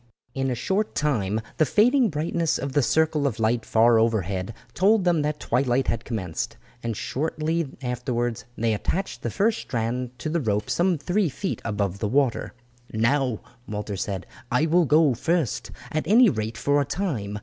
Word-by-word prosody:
In 135 0 -1
a 125 - -1
short 195 - -1
time 110 -8 0 0.2
the - - +4
fading 245 - +4
brightness 160 +1 0
of 135 0 -4
the 145 - +3
circle 155 +2 +2
of 115 -5 -3
light 115 +1 +1
far 115 +1 +4
overhead 100 -3 0 0.2
told 205 +2 +3
them 175 -3 +3
that 150 0 -2
twilight 130 0 +1
had 115 - -1
commenced, 95 -9 -4 0.2
and 115 -3 -3
shortly 155 +3 -1 0.2
afterwards 120 -2 -2
they 115 -1 +1
attached 185 - -2
the - - -2
first 215 +2 +1
strand 120 +1 -3
to 155 - -5
the 165 +1 0
rope 105 -3 -1
some 175 0 +2
three 175 +5 0
feet 190 +8 -4
above 100 -3 -2
the 105 - -1
water. 135 -1 +1 0.4
"Now," 120 +1 +1 0.3
Walter 105 -1 -4
said, 95 0 -3 0.3
"I 125 +6 +3
will 170 +2 +3
go 150 -1 +4
first, 160 +3 -1 0.2
at 155 - -2
any 230 +3 +6
rate 110 -1 -3
for 145 0 +2
a - - 0
time. 125 - -3
130 Hz, 170 wpm, -25 LUFS, 110-160 Hz, 0.4 s, any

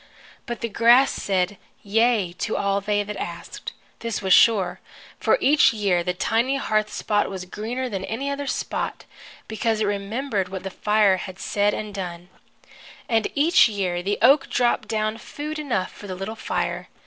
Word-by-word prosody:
But 240 -1 -5
the 235 - -1
grass 235 +4 +5
said 190 0 -1 0.2
yea 215 -3 +2
to 220 - -1
all 200 0 0
they 205 +1 0
asked, 210 0 -6 0.3
this 230 -2 -3
was 190 -2 +2
sure, 205 -6 +4 0.4
for - - +3
each 290 -3 +5
year 195 -5 +1
the 180 - 0
tiny 235 +8 +1
hearth 215 -5 0
spot 205 -1 0
was 190 -2 -6
greener 235 +7 -4
than 195 -5 -4
any 250 +6 -4
other 280 0 -4
spot, - - -3 0.4
because 220 0 -1
it 215 - +1
remembered 205 0 -2
what 190 0 -6
the 190 - -5
fire 210 -1 +3
had 185 0 -7
said 205 +1 0
and 215 -1 -5
done. 180 -2 -6 0.8
And 225 -2 +2
each 300 -3 +5
year 185 -4 -2
the 200 +3 -1
oak 280 +3 +5
dropped 240 -3 +1
down 215 0 -1
food 300 +6 -6
enough 240 -11 -2
for 205 - -11
the 185 - -5
little 195 +4 -5
fire. - - -3
210 Hz, 170 wpm, -23 LUFS, 195-235 Hz, 0.8 s, grass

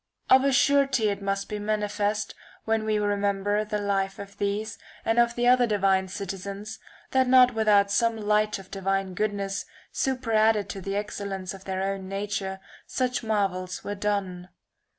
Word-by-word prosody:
Of 260 0 +7
a 275 - +3
surety 275 -4 +3
it 200 0 -3
must 195 0 -2
be 210 - -4
manifest, 210 0 -1 0.3
when 220 -1 0
we 215 -1 +1
remember 205 0 0
the 210 0 -3
life 195 -1 -1
of 200 0 -10
these 205 +2 -2 0.3
and 225 +1 +2
of 235 0 +3
the 240 - 0
other 250 -1 +5
divine 195 -3 +2
citizens, 200 +2 -6 0.3
that 260 -1 +3
not 250 -1 +6
without 210 -3 +3
some 230 +2 +2
light 210 0 +1
of 195 - -11
the 195 - -5
divine 195 0 -1
goodness, 200 0 -2 0.3
superadded 225 -5 +1
to 195 - -5
the 195 +2 -3
ex 210 +1 -3
cellence 195 -2 -4
of 195 0 -12
their 190 0 -2
own 195 -1 -3
nature, 195 -1 -3 0.3
such 255 -1 -1
marvels 195 -5 -1
[ii. - - -4
were 205 - -2
done. 195 -3 -2
205 Hz, 170 wpm, -26 LUFS, 195-220 Hz, 0.3 s, Of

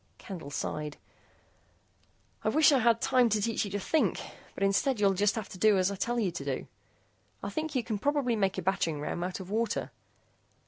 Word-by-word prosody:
Candle 175 - -8
sighed. 150 +1 -4 1.5
"I - - +2
wish 310 0 +5
I 275 - +4
had 230 -1 +3
time 250 -2 +4
to 215 0 +2
teach 220 +1 0
you - - -5
to 205 +1 -2
think, 315 +10 +1 0.4
but - - -3
instead, 200 +5 +2
you'll 200 -2 +3
have 205 +2 +1
to - - -9
do 215 -1 +5
as 185 +1 +2
I - - -3
tell 240 +5 -1
you 200 -6 +1
to 170 - -6
do. - - -3 0.8
I - - -3
think 315 -2 -3
you 250 - +1
can 215 -3 -3
probably 280 -2 +1
make 195 -3 0
a 185 - -3
battering 170 -5 0
ram 150 +4 -3
out 180 +1 -3
of 190 0 -8
water. 225 +1 -1
205 Hz, 200 wpm, -30 LUFS, 190-235 Hz, 1.5 s, wish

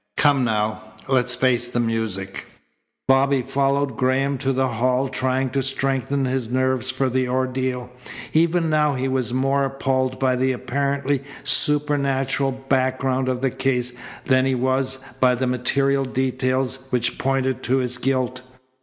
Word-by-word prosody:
Come, 140 -3 +4
now. 110 -2 0 0.3
Let's 125 -2 +2
face 125 -1 +1
the 120 0 -2
music." 110 -5 -2 0.6
Bobby 135 0 +3
followed 140 -1 0
Graham 130 +1 +1
to 135 -1 0
the 130 0 +1
hall, 125 +3 +1
trying 130 0 -1
to 135 - 0
strengthen 135 +1 -1
his 130 -3 -2
nerves 130 0 0
for 130 +1 0
the 130 0 0
ordeal. 130 -1 -2 0.4
Even 165 +1 +2
now 150 -2 +2
he 130 +1 -1
was 130 -3 -1
more 135 +2 +1
appalled 130 -1 -1
by 130 -1 +1
the 130 +1 +1
apparently 140 +2 -1 0.2
supernatural 140 -2 +2
background 130 0 0
of 125 -1 -2
the 135 -1 +1
case 125 -2 -1 0.3
than 130 -2 +3
he 135 - +1
was 130 +1 0 0.2
by 125 -1 +4
the 130 +2 -1
material 135 +2 +1
details 130 0 -1
which 120 -2 -1
pointed 130 -1 0
to 130 +2 +1
his 125 -2 -2
guilt. 130 -1 -1
130 Hz, 145 wpm, -22 LUFS, 125-135 Hz, 0.6 s, Come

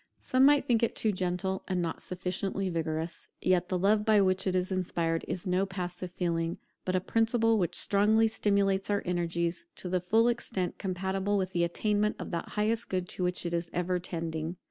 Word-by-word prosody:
Some 255 +1 +3
might 290 0 +4
think 235 -3 +2
it 235 - +1
too 220 - +1
gentle, 185 0 -1
and 185 -2 0
not 170 -2 -2
sufficiently 185 +1 -3
vigorous; 160 0 -3
yet 180 -1 +1
the 185 - +1
love 205 +3 +3
by 215 -1 +4
which 190 0 +2
it 185 - +1
is 185 +1 0
inspired 170 -3 -1
is 180 - -4
no 185 +1 +1
passive 180 -1 -5
feeling, 170 -2 -1 0.3
but 185 - 0
a - - +3
principle 225 +2 +2
which 175 -4 -1
strongly 215 +3 +4
stimulates 200 -3 +1
our 205 -1 +1
energies 170 - -1
to 180 - -3
the 180 0 0
full 220 +6 +3
extent 215 -6 -2
compatible 190 +1 -1
with 190 -1 -1
the 175 -2 +1
attainment 210 +4 +1
of - - -6
that 170 -1 -3
highest 220 +2 +1
good 185 -1 -1
to 180 - -2
which 180 0 -1
it 170 - -2
is 170 0 -1
ever 180 +1 0
tending. 165 -1 -4
185 Hz, 195 wpm, -30 LUFS, 175-205 Hz, 0.3 s, might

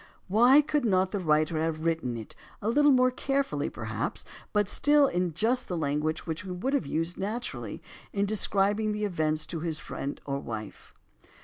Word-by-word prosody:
Why 240 +9 +6
could 300 -1 0
not 190 -4 +2
the 205 - -1
writer 155 -1 +2
have 160 0 -2
written 160 -8 0
it, 110 - -9 0.2
a 210 - -1
little 290 +5 +5
more 255 -2 +5
carefully 275 +2 -1
perhaps, - - -4 0.3
but 210 -1 +2
still 290 +6 +4
in 180 - -1
just 245 +6 +1
the 180 - -3
language 155 +1 -1
which 160 -1 -3
he 185 - -9
would 185 +10 -2
have 280 - 0
used 165 +2 -2
naturally 220 +5 -4 0.3
in 200 0 0
describing 205 +1 +1
the 210 0 -1
event 155 -5 0
to 165 - -3
his 160 -1 -2
wife - - -12 0.4
or 140 0 -2
friend? 110 -2 -7
190 Hz, 180 wpm, -28 LUFS, 160-240 Hz, 0.4 s, Why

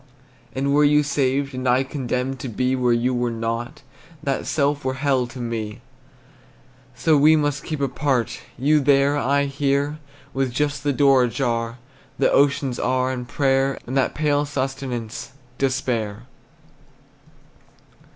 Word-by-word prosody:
And 140 +1 0
were 150 +1 +5
you 150 0 +4
saved, 140 -1 0
And 130 0 -1
I 125 +2 +3
condemned 130 -1 -3
to 130 - -5
be 125 +3 0
Where 125 -1 +1
you 120 +2 +1
were 120 0 0
not, 115 +5 -4 0.4
That 135 -1 -2
self 145 -1 0
were 130 0 -1
hell 130 -2 +1
to 120 - -11
me. 115 -2 -4 1.1
So 155 +5 +3
we 150 +2 +6
must 145 -2 0
keep 155 -2 -4
apart, 135 -3 0 0.2
You 150 +5 +3
there, 140 0 +3
I 140 0 +1
here, 140 +1 0 0.3
With 135 -1 0
just 145 +1 -1
the 145 - +2
door 135 -2 +4
ajar 115 -2 -2 0.4
That - - +2
oceans 140 -2 +2
are, 130 0 +1
And 125 -1 -5
prayer, 135 0 +1
And 130 - -5
that 135 - +1
pale 145 -1 +1
sustenance, 135 -3 -4 0.3
Despair! 120 -5 -1
135 Hz, 140 wpm, -22 LUFS, 125-140 Hz, 1.1 s, we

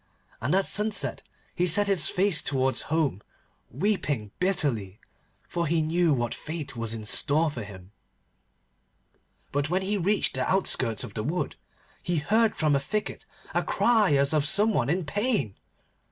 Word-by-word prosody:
And 135 +9 +1
at 195 - +2
sunset 210 0 +1 0.3
he 180 - 0
set 205 +5 +3
his 190 -6 +3
face 185 -4 +2
towards 130 -1 0
home, 150 - 0 0.5
weeping 145 - -1
bitterly, 125 - 0 0.5
for 170 -1 -2
he 165 +2 +1
knew 165 +2 +1
what 120 -4 0
fate 155 -4 -6
was 115 -1 -4
in 110 -1 -7
store 150 +7 +2
for 125 - -6
him. 95 -2 -12 1.6
But 145 +1 -1
when 185 +2 0
he 195 +2 -1
had 195 -5 -1
reached 210 0 +1
the - - -1
outskirts 130 - +1
of - - -8
the 110 - -3
wood, 165 +9 -2 0.5
he 175 - -2
heard 215 +8 +2
from 150 -2 +2
a - - +2
thicket 210 +10 -4 0.3
a - - +2
cry 220 -10 +3
as 140 +2 +2
of 150 -1 +2
some 210 +5 +3
one 130 -7 0
in 175 +2 0
pain. 205 - -1
155 Hz, 165 wpm, -26 LUFS, 130-195 Hz, 1.6 s, set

